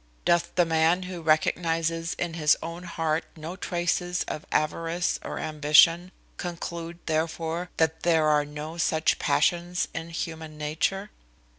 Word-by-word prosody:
Doth 170 0 +2
the 175 - +4
man 165 +2 +2
who 180 -2 -6
recognizes 165 +1 +1
in 175 -2 -3
his 155 -2 +3
own 170 +2 -6
heart 165 -2 -1
no 160 +3 -6
traces 175 -1 -1
of 155 - -6
avarice 165 +3 0
or - - -5
ambition, 155 +4 +4 0.3
conclude, 170 -1 -5
therefore, 165 +2 -1
that 160 0 +1
there 165 -2 +3
are 150 -1 +4
no 150 +3 -7
such 160 0 +2
passions 175 +1 +1
in 165 - -5
human 160 -2 -5
nature? 165 +7 -1
165 Hz, 135 wpm, -26 LUFS, 160-175 Hz, 0.3 s, the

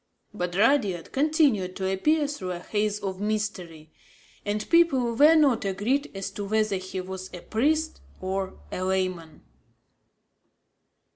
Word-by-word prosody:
But 180 -3 -3
Rudyard 205 - +2
continued 275 - +2
to 190 - -2
appear 295 +12 +2
through 190 -11 -4
a 175 - -6
haze 210 +2 -1
of 190 -1 -4
mystery; 190 -7 -3 0.5
and 210 +1 -2
people 275 -9 +3
were 300 +6 +7
not 275 -8 +4
agreed 205 +9 0
as 195 0 -4
to 205 - -5
whether 215 -1 +1
he 185 0 -6
was 185 0 -7
a 175 - -9
priest 310 +7 0 0.2
or 190 +1 -3
a - - -4
layman. 185 -4 -2
205 Hz, 135 wpm, -26 LUFS, 185-265 Hz, 0.5 s, were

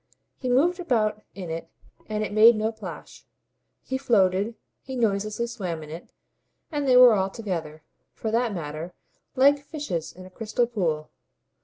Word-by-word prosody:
He 255 - -3
moved 330 +9 +3
about 220 -10 0
in 180 -4 -6
it 165 +1 -5 0.4
and 215 0 -2
it 210 - -4
made 225 +2 +8
no 215 +1 0
plash; 220 -1 -10 0.6
he 265 0 -3
floated, 200 -2 +2 0.3
he 265 - -7
noiselessly 215 -1 0
swam 185 -9 -5
in 150 - -10
it, 165 +2 -9 0.6
and 290 -2 -1
they 255 -1 +6
were 250 -2 +9
all 195 -2 +1
together, 165 -8 -5 0.3
for 220 - -3
that 235 0 +1
matter, 165 -1 -6 0.4
like 280 +2 +5
fishes 280 - -4
in 185 +1 -12
a 185 - -13
crystal 225 +4 0
pool. 170 -10 -2
215 Hz, 160 wpm, -25 LUFS, 185-245 Hz, 0.6 s, were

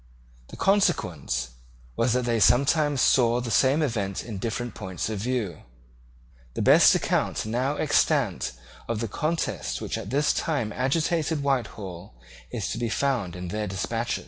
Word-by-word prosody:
The - - -11
consequence 90 - +1 0.4
was 115 0 +1
that 125 -1 0
they 120 -1 +1
sometimes 140 - +3
saw 120 -2 +4
the 120 -1 -4
same 135 +8 +3
event 100 -8 -2
in 110 -4 -6
different 120 +3 -3
points 95 +2 -4
of 105 - -3
view. 110 -7 -2 1.0
The - - -2
best - - +7
account - - 0
now 125 +6 -1
extant 145 - +1 0.4
of 115 -2 -1
the 115 - -2
contest 160 +9 -2
which - - -4
at 95 - -7
this 145 +4 +2
time 120 -10 -1
agitated 155 +3 0
Whitehall 100 - -3 0.3
is 100 - -3
to 115 - -3
be 120 -1 -1
found 115 -9 -1
in 90 -1 -6
their 105 +3 -3
despatches. 115 +5 -2
120 Hz, 150 wpm, -26 LUFS, 100-140 Hz, 1.0 s, best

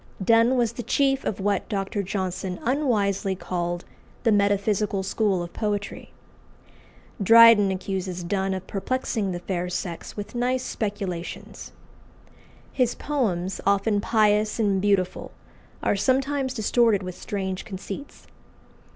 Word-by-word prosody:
Donne 230 +5 +4
was 235 -3 +2
the 245 - -5
chief 270 +3 +1
of 200 - -2
what 200 -1 -1
Dr. 200 -1 -2
Johnson 185 -1 -3
unwisely 210 -8 +1
called 175 -1 -3 0.4
"the 230 - +3
metaphysical 200 -1 +1
school 195 -2 0
of 170 - -9
poetry." 205 -2 -3 1.1
Dryden 225 -1 +8
accuses 185 -1 -3
Donne 190 +2 -1
of 185 - -6
perplexing 215 -1 -2
the 175 - -3
fair 180 0 -3
sex 175 +1 -5
with 205 - -6
nice 250 +1 0
speculations. 200 -7 -5 1.0
His 250 -3 +1
poems, 195 -11 -2
often 200 +1 +2
pious 215 0 +2
and 200 -3 +2
beautiful, 195 -3 0 0.5
are - - +2
sometimes 265 +4 0
distorted 220 -2 +2
with 185 0 -5
strange 190 -1 -4
conceits. 200 +6 -8
200 Hz, 120 wpm, -25 LUFS, 190-230 Hz, 1.1 s, Dryden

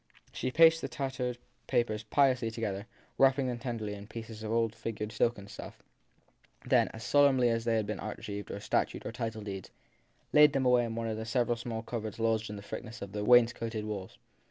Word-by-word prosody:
She 130 - -2
placed 165 +3 +6
the - - -2
tattered 130 -3 -3 0.3
papers 110 -3 +1
piously 125 +1 +2
together, 110 -2 -4 0.3
wrapping 135 0 +5
them 125 -2 -2
tenderly 115 -4 -4
in 100 0 -8
a - - -18
piece 110 -1 -8
of 110 0 -4
old 115 -1 +1
figured 110 -2 -5
silken 115 -5 0
stuff; - - -10 0.8
then, - - +4
as 110 - -9
sol 145 0 +5
emnly 125 -3 +3
as 115 0 +1
if - - -12
they 115 -1 +2
had 110 -2 +1
been 105 - -4
archives 105 -1 -6
or 100 - -5
statutes - - -1
or - - -3
title 115 -2 -4
deeds, 95 -2 -6 0.6
laid 150 -1 +7
them 135 -1 +1
away 125 -1 +4
in 115 -1 -4
one 115 0 -2
of 110 -1 -2
the 110 - -4
several 120 0 +1
small 115 -1 -5
cupboards 110 -2 -5
lodged 110 -1 0
in 105 - -5
the 100 - -8
thickness 115 +2 -7
of 100 - -8
the 105 0 -3
wainscoted 115 -2 +3
walls. 100 -3 -6
115 Hz, 210 wpm, -31 LUFS, 110-125 Hz, 0.8 s, laid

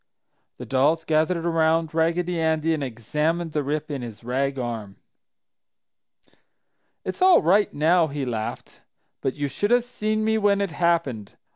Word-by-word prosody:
The - - -8
dolls 150 +5 +1
gathered 160 +2 +1
around 165 -1 +1
Raggedy 170 +1 0
Andy 160 0 +1
and 150 -3 -2
examined 150 +8 -2
the 150 - -1
rip 150 +2 -3
in 140 -3 -4
his 115 -2 -9
rag 135 +3 -1
arm. 115 -5 -5 2.1
"It's 185 - -5
all 370 -1 +6
right 200 +6 +3
now!" 165 +3 +3
he 140 -2 -4
laughed. 110 -3 -5 0.4
"But 130 - -2
you 145 -1 -2
should 205 +9 -2
have 245 0 +4
seen 215 -3 -2
me 220 0 +2
when 205 -1 +3
it 200 -3 -1
happened! 155 - -1
160 Hz, 150 wpm, -24 LUFS, 140-175 Hz, 2.1 s, all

